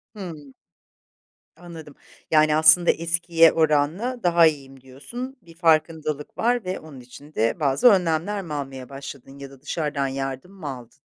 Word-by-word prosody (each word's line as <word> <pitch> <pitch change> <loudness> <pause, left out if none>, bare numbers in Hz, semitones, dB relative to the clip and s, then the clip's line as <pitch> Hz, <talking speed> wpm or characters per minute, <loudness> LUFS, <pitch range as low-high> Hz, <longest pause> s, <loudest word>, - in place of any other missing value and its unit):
Hımm. 155 -9 -9 1.0
Anladım. 165 -4 -12 0.4
Yani, 155 -1 +4
aslında 160 +3 +6
eskiye 170 0 +3
oranla 160 - 0
daha 170 -1 +5
iyiyim, 135 -3 -5
diyorsun. 240 - -9
Bir 165 -1 -18
farkındalık 155 -3 0
var 240 -3 0
ve 185 +1 -4
onun 150 -4 -13
için 140 +5 -15
de 115 +9 0
bazı 140 - +3
önlemler 190 0 +2
mi 160 -5 -8
almaya 135 -2 -6
başladın 135 0 -10
ya 140 -1 -9
da 135 -1 -17
dışarıdan 145 -3 -2
yardım 135 +5 -5
mı 175 -7 -9
aldın? 125 -3 -10
155 Hz, 145 wpm, -23 LUFS, 140-175 Hz, 1.0 s, aslında